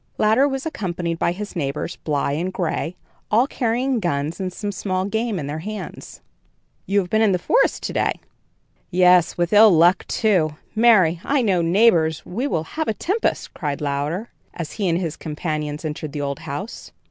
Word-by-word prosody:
Louder 220 +6 +4
was 270 0 -3
accompanied 175 - -3
by - - +2
his 205 +3 -6
neighbors 150 +1 -3
Bly 145 -2 -1
and 170 +6 -2
Gray, 175 -1 -2 0.3
all 230 +4 +4
carrying 250 -1 0
guns 155 -3 -2
and 185 -1 -2
some 205 +2 -4
small 185 -1 -2
game 220 +1 -1
in 150 - -4
their 145 +2 -4
hands. 210 +5 -7 0.7
"You 200 - +1
have 180 - -7
been 220 - +3
in 210 -3 +4
the - - +2
forest 475 - +1
to - - -3
day?" - - +1 0.8
"Yes, 180 -2 +4
with 175 +2 0
ill 215 +1 +8
luck, 175 +1 +4
too. 180 -9 +1 0.2
Marry! 205 -8 +4
I 280 -2 +1
trow, 190 -5 +2
neighbors, 170 -3 +3
we 240 +10 -2
will 160 - -1
have 315 - -4
a 220 - 0
tempest," 400 - -1
cried 145 -4 -3
Louder, 150 +9 -2 0.2
as 170 -3 -5
he 200 -4 -1
and 165 - +2
his 165 -4 -3
companions 150 -1 -4
entered 150 -1 -5
the 145 - -3
old 140 0 -3
house. 160 +7 -7
180 Hz, 180 wpm, -22 LUFS, 160-215 Hz, 0.8 s, ill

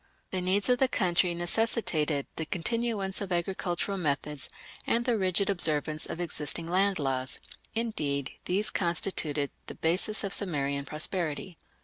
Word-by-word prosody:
The 185 - -1
needs 190 +2 +2
of 250 -1 +3
the 265 - +5
country 180 -6 +2
necessitated 175 -6 +1
the 160 - -3
continuance 205 +1 -1
of 195 -2 -4
agricultural 180 +2 -1
methods 150 -3 -1 0.4
and 235 +1 +2
the 245 -2 +2
rigid 190 -1 +2
observance 155 -5 +2
of 160 - -5
existing 165 -1 -2
land 190 +2 +3
laws; 130 -2 -1 0.4
indeed, 150 - -1
these 200 +4 +2
constituted 160 -5 +2 0.2
the - - -7
basis 185 +7 +1
of 200 -1 -1
Sumerian 140 -7 -1
prosperity. 155 +2 -3
175 Hz, 135 wpm, -29 LUFS, 150-200 Hz, 0.4 s, the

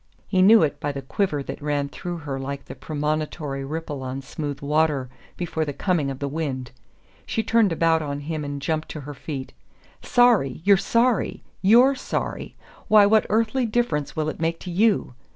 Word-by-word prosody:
He 185 -2 +2
knew 210 0 +7
it 150 - -1
by 145 - -2
the 140 -1 -6
quiver 150 -1 -1
that - - -7
ran 145 -1 -1
through 175 +4 -6
her 135 -2 -3
like 140 +1 -5
the - - -8
premonitory 150 -2 -3
ripple 150 -1 -5
on 130 +1 -5
smooth 145 +1 -5
water 145 -3 +1 0.3
before 165 -2 -2
the 145 -2 -3
coming 165 -4 0
of 135 - -4
the 140 - -3
wind. 135 -4 -3 0.6
She 225 - -1
turned 225 -3 +3
about 165 0 +2
on 145 -1 -4
him 155 +1 -4
and 145 0 -4
jumped 155 +2 -2
to 155 - -6
her 145 +2 -7
feet. 135 -2 -6 0.5
"Sorry 235 - +3
you're 200 +1 +6
sorry? 230 +3 +1 0.2
YOU'RE 240 +7 +6
sorry? 265 - -4 0.3
Why, 210 -1 +7
what 215 +1 +4
earthly 230 +3 +1
difference 210 -11 -1
will 155 -1 -1
it 155 - -4
make 165 0 0
to 180 - -6
YOU?" 205 - +2
155 Hz, 185 wpm, -24 LUFS, 140-200 Hz, 0.6 s, knew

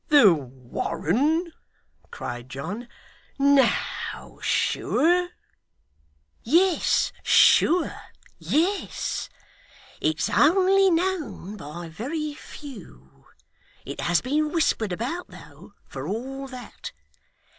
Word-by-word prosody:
'The 260 - +7
Warren!' 170 - -1 0.6
cried 120 +1 -7
John. 180 - -6 0.5
'No, 280 -1 +1
sure!' 350 +3 +1 1.1
'Yes, 345 +7 +2
sure 350 0 +5 0.5
yes. 370 +6 -1 0.7
It's 155 0 +1
only 385 +4 +4
known 335 - -1
by 170 -2 -8
very 290 - -4
few. 210 - -13 0.6
It - - -6
has 175 -1 +2
been 300 +4 0
whispered 255 - +1
about 255 - -3
though, - - -15
for 135 +1 -7
all 265 +7 -4
that. 255 -3 -9
270 Hz, 80 wpm, -25 LUFS, -, 1.1 s, The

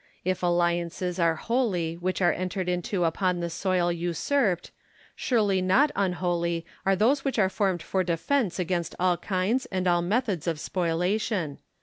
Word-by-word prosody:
If 185 0 0
alliances 175 +1 0
are 165 -1 +3
holy 195 -7 0
which 185 +2 -2
are 175 - +4
entered 185 0 -3
into 180 +1 -1
upon 180 +2 +1
the 170 -1 -3
soil 180 0 +1
usurped, 175 - 0 0.4
surely 205 -6 +1
not 250 +11 +4
unholy 175 -3 0 0.2
are 195 - +4
those 255 +8 +2
which 270 -3 -1
are 190 -3 +3
formed 190 -5 0
for 190 +2 0
defence 180 - 0
against 175 -2 -2
all 180 -1 +2
kinds 200 +8 -1
and 185 -1 -2
all 175 -1 +3
methods 195 - -1
of 165 -2 -1
spoliation. 180 -1 -1
180 Hz, 150 wpm, -27 LUFS, 170-195 Hz, 0.4 s, are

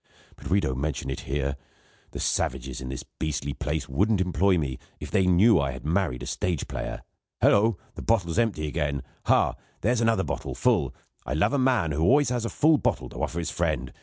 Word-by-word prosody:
But - - -9
we 95 - +4
don't 65 -8 -2
mention 70 -3 -2
it 65 - -6
here. 70 -1 -1 0.5
The - - -7
savages 65 -1 -1
in 65 - -5
this 65 - -5
beastly 70 -2 -3
place 75 -1 -3
wouldn't 100 +10 +2
employ 95 +1 +2
me, 70 -6 -2 0.2
if - - -7
they 95 - +3
knew 95 +3 +5
I 70 -2 0
had 65 +2 -9
married 80 -6 0
a - - -4
stage 85 -5 -2
player. - - -5 0.4
Hullo! 105 0 +4 0.2
The - - -8
bottle's 100 -4 +1
empty 105 -10 +1
again. 70 -1 -2 0.2
Ha! - - +3 0.3
here's 120 +3 +2
another 115 -1 +3
bottle, - - -4
full. - - +1 0.3
I 70 - -3
love 80 - +2
a 140 - +2
man 125 -11 +2
who 70 - -2
has 80 - +3
always 145 0 +5
got 120 -2 -1
a - - -2
full 155 -1 +4
bottle - - -1
to - - -7
offer 80 - -2
his 85 -1 -2
friend. 75 -7 -1
85 Hz, 210 wpm, -26 LUFS, 70-110 Hz, 0.5 s, knew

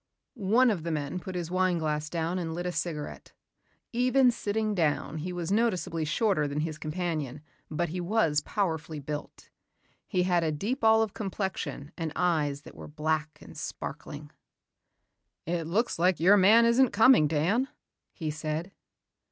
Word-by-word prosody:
One 235 +2 +3
of 190 -6 -2
the 170 - -4
men 150 +2 -2
put 185 +1 -7
his 175 -1 -3
wine 185 -1 +2
glass 150 -1 -2
down 170 +2 -1
and 165 -2 -3
lit 175 +1 -4
a 180 - -1
cigarette. 155 -4 -5 0.6
Even 250 +1 +4
sitting 215 -1 -1
down 155 -3 0
he 180 +4 -4
was 175 0 -4
noticeably 185 -7 +1
shorter 180 -2 +1
than 145 +1 -2
his 155 -1 -4
companion 155 -4 -3 0.3
but 170 +2 -1
he 180 +3 -3
was 170 -6 +2
powerfully 160 -6 -2
built. 150 +1 -7 0.6
He 180 -4 +1
had 175 -2 +2
a 160 - +1
deep 210 - -3
olive 220 -1 +4
complexion 185 - -4
and 165 -2 -2
eyes 150 -5 0
that - - -12
were - - -10
black 155 0 -2
and - - -13
sparkling. 145 0 -7 1.1
"It 170 -1 -2
looks 205 +3 0
like 180 +1 +3
your 185 +5 +6
man 210 +4 +6
isn't 240 +2 +4
coming, 220 - +6
Dan," 175 - +1 0.4
he 155 -3 -4
said. 155 +4 -4
175 Hz, 160 wpm, -28 LUFS, 155-205 Hz, 1.1 s, your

